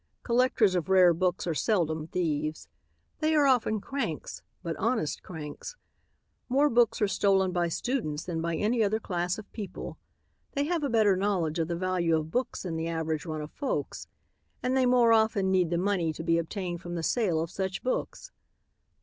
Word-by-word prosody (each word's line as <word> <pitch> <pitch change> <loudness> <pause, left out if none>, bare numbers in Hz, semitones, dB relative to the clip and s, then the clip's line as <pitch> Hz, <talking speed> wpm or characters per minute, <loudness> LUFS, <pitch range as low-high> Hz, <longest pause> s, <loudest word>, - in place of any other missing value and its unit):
Collectors 240 -4 +3
of 180 -1 -1
rare 185 -2 +6
books 180 +1 0
are 170 - 0
seldom 160 -4 0
thieves. 155 -3 -2 0.5
They 315 0 +2
are 295 -2 +5
often 245 -5 +3
cranks, 225 - -4 0.2
but 165 -1 -3
honest 220 -10 -1
cranks. 160 - -8 0.7
More 280 +4 +3
books 235 -2 +3
are - - +4
stolen 195 -2 +2
by 175 -1 +1
students 165 - -2
than 165 -2 -3
by 170 0 -1
any 225 +5 +1
other 215 +1 +2
class 175 -3 -2
of 215 - -10
people. 205 -4 -7 0.5
They 280 - 0
have 335 +2 -1
a 285 - 0
better 215 -4 +4
knowledge 185 -5 0
of 160 - 0
the 170 - -2
value 175 -2 +1
of 155 0 -4
books 250 +6 -2
than 170 -3 -3
the 160 0 -2
average 160 -1 -2
run 155 -1 -3
of 150 - -7
folks, 285 - -3 0.6
and 250 +1 +1
they 260 -1 +3
more 245 -2 +5
often 220 -4 +2
need 180 -3 +3
the 170 - 0
money 180 -3 +1
to 160 - -7
be 165 0 +2
obtained 175 0 -4
from 175 -1 -6
the 165 - -3
sale 185 -3 +1
of 165 +1 -3
such 190 -1 -3
books. 255 - -3
185 Hz, 185 wpm, -28 LUFS, 165-225 Hz, 0.7 s, rare